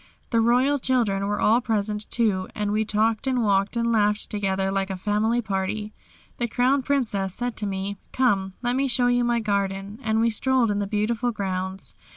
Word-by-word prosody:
The 230 -2 +3
royal 255 +5 +3
children 225 -7 0
were 205 0 -1
all 230 +3 +4
present, 210 -2 -2
too, 205 -6 +1
and 210 -1 -1
we 215 +1 +1
talked 220 +3 0
and 255 -2 +1
walked 200 +1 +1
and 235 0 +1
laughed 210 -2 +1
together 195 -2 -1
like 195 0 -1
a 190 - -3
family 215 +5 0
party. 210 +1 -3 0.4
The 240 - -1
Crown 255 +4 +2
Princess 215 -9 -1
said 245 -1 -3
to 210 - -2
me, 195 +1 -3
"Come, 195 -7 +1
let 245 0 +1
me 275 +1 +1
show 245 -1 +2
you 245 0 +3
my 240 0 +1
garden," 200 0 -2
and 220 -1 0
we 230 +1 +3
strolled 250 0 +1
in 205 - -1
the 200 - -2
beautiful 220 +4 0
grounds. 190 -2 -4
215 Hz, 190 wpm, -24 LUFS, 200-240 Hz, 0.4 s, all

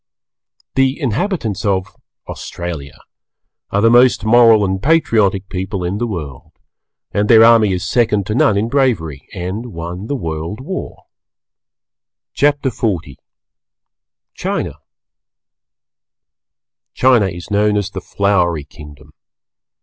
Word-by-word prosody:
The 135 +2 +1
inhabitants 130 - -2
of 95 -3 -1 0.3
Australia 85 -5 -7 0.7
are 100 - 0
the 115 +1 +4
most 120 -2 +4
Moral 115 -2 +5
and 95 0 -2
Patriotic 110 - +2
people 95 0 -4
in 90 +4 -2
the 120 - -1
World, 75 - -7 0.6
and 105 +1 0
their 115 -1 +8
army 115 -3 +5
is 90 -1 -2
second 105 -5 +1
to 105 - -3
none 110 -3 +3
in 105 +3 0
bravery 110 - -1
and 95 +7 -5
won 90 0 -7
the 145 - -2
World 80 - -5
War. 185 +8 -6 1.3
CHAPTER 145 -2 +1
XL 110 -3 0 1.4
CHINA - - -4 2.2
China 125 -6 +4
is 85 +1 -8
known 105 0 +2
as 100 -2 -2
the - - -6
Flowery 90 -6 0
Kingdom. 75 -1 -14
105 Hz, 115 wpm, -17 LUFS, 90-120 Hz, 2.2 s, their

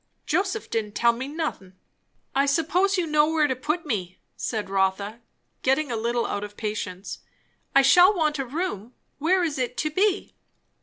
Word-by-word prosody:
"Joseph 385 +6 -1
didn't 210 -2 -2
tell 235 0 +4
me 255 +3 -5
nothin'." 290 - -4 0.6
"I 275 +1 +2
suppose 355 +7 +2
you 360 - +1
know 305 -1 +3
where 315 -2 +3
to 260 -3 0
put 305 +6 -2
me," 185 - -3 0.2
said 215 -4 -3
Rotha, 195 +3 0 0.4
getting 270 +1 +1
a - - -1
little 235 +1 0
out 205 - -3
of 205 0 -9
patience. 205 -3 -4 0.6
"I 275 - +7
shall 360 +7 +7
want 305 -4 +1
a 270 - -1
room. 250 - -4 0.2
Where 360 +5 +3
is 305 -5 -1
it 250 -1 -2
to 305 - -1
be?" 395 +4 +1
275 Hz, 170 wpm, -25 LUFS, 215-320 Hz, 0.6 s, I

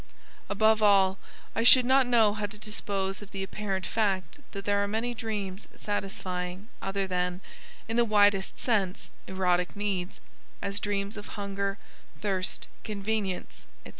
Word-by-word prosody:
Above 215 +2 +4
all 195 -2 +5 0.4
I - - +1
should 250 +1 +8
not 260 0 +5
know 225 -4 +5
how 210 -1 -2
to 210 - -11
dispose 200 -2 -2
of 205 - -10
the 195 -2 -4
apparent 195 -1 -3
fact 195 - 0
that 200 -1 -6
there 200 0 +2
are - - 0
many 225 +4 -1
dreams 210 -4 -4
satisfying 190 -1 -3
other 195 0 -1
than 180 -1 -1 0.5
in 225 +1 -1
the 240 - +6
widest 205 -3 +3
sense 200 -7 0 0.2
erotic 180 -1 +1
needs, 200 -3 -2 0.4
as 200 0 -2
dreams 200 +1 -2
of 205 - -7
hunger, 200 0 -2 0.4
thirst, 190 -3 -2 0.2
convenience, 205 -2 -3 0.2
&c. - - -8
200 Hz, 145 wpm, -29 LUFS, 190-215 Hz, 0.5 s, should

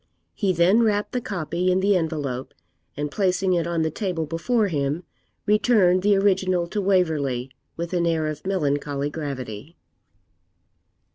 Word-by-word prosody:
He 200 -3 0
then 185 +6 +4
wrapped 210 -2 +1
the 250 - -2
copy 180 -2 -1
in 185 - +2
the 200 +1 +3
envelope, 150 -7 -3 0.4
and 145 0 -3
placing 185 0 +1
it 170 -1 0
on 170 -2 0
the 160 - -1
table 180 -4 -2
before 205 +9 0
him, 150 0 -1 0.4
returned 210 -4 +4
the 205 +1 +4
original 190 -3 +2
to 210 - -2
Waverley, 155 -10 +1 0.3
with 170 +2 -4
an 170 -1 +1
air 160 -2 +1
of 155 -1 -4
melancholy 145 -5 -1
gravity. 140 -2 -6
170 Hz, 145 wpm, -24 LUFS, 150-195 Hz, 0.4 s, then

